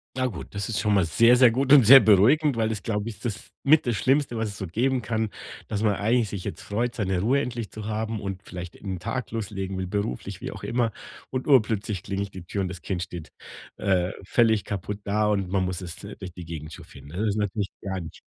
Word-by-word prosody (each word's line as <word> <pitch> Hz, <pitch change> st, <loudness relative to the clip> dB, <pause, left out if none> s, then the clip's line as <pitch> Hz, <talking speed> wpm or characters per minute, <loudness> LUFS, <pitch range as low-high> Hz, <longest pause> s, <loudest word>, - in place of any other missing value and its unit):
Ah 130 Hz, 0 st, 0 dB
gut, 110 Hz, -9 st, -4 dB
das 100 Hz, 0 st, -2 dB
ist 110 Hz, -6 st, -1 dB
schon 105 Hz, +1 st, +2 dB
mal 95 Hz, -, +3 dB
sehr, 115 Hz, +9 st, +5 dB
sehr 125 Hz, -2 st, +6 dB
gut 135 Hz, +3 st, 0 dB
und 145 Hz, -3 st, +9 dB
sehr 135 Hz, +4 st, +11 dB
beruhigend, 120 Hz, +8 st, +5 dB
weil 110 Hz, -1 st, +1 dB
das, 110 Hz, -3 st, -3 dB
glaube 105 Hz, -1 st, -2 dB
ich, 115 Hz, -, -5 dB
ist -, -, -14 dB
das 105 Hz, -3 st, -5 dB
mit 150 Hz, +1 st, +5 dB
das 120 Hz, -3 st, 0 dB
Schlimmste, 135 Hz, +1 st, +1 dB
was 110 Hz, -1 st, -1 dB
es 100 Hz, -, -9 dB
so 95 Hz, -, -4 dB
geben 125 Hz, +9 st, 0 dB
kann, 110 Hz, +1 st, -1 dB, 0.4 s
dass 105 Hz, 0 st, -2 dB
man 105 Hz, -2 st, +3 dB
eigentlich 115 Hz, +1 st, +1 dB
sich 95 Hz, -2 st, -5 dB
jetzt -, -, -5 dB
freut, 115 Hz, +4 st, -2 dB
seine 95 Hz, -4 st, 0 dB
Ruhe 130 Hz, +7 st, +3 dB
endlich 120 Hz, -5 st, -4 dB
zu 110 Hz, -1 st, -8 dB
haben 110 Hz, 0 st, -2 dB
und 95 Hz, -1 st, -5 dB
vielleicht 90 Hz, -1 st, -8 dB
in -, -, -11 dB
den 95 Hz, -2 st, -3 dB
Tag 115 Hz, +5 st, -4 dB
loslegen 95 Hz, -3 st, -4 dB
will, 95 Hz, -, -2 dB
beruflich, 100 Hz, -9 st, -3 dB
wie -, -, -4 dB
auch -, -, -10 dB
immer, 120 Hz, -2 st, 0 dB, 0.4 s
und 130 Hz, 0 st, -3 dB
urplötzlich 110 Hz, -, +2 dB
klingelt 100 Hz, 0 st, -4 dB
die 95 Hz, -, -8 dB
Tür 100 Hz, -, -3 dB
und 95 Hz, -, -1 dB
das 90 Hz, -2 st, -8 dB
Kind 90 Hz, -1 st, -2 dB
steht, 85 Hz, -3 st, -8 dB, 0.5 s
äh, 95 Hz, -2 st, +1 dB
völlig 110 Hz, +1 st, +3 dB
kaputt 100 Hz, +1 st, -5 dB
da 105 Hz, +1 st, +1 dB
und 100 Hz, -3 st, 0 dB
man 95 Hz, -1 st, +1 dB
muss 90 Hz, 0 st, -3 dB
es, 85 Hz, +1 st, -8 dB
äh, 100 Hz, +1 st, -8 dB
durch 95 Hz, -3 st, -8 dB
die 90 Hz, -2 st, -9 dB
Gegend 80 Hz, -1 st, -7 dB
chauffieren. 70 Hz, -, -12 dB
Das 85 Hz, +5 st, -6 dB
ist 105 Hz, 0 st, 0 dB
natürlich 105 Hz, -1 st, -1 dB
gar 95 Hz, -1 st, -3 dB
nicht 80 Hz, -, -10 dB
105 Hz, 245 wpm, -25 LUFS, 95-115 Hz, 0.5 s, sehr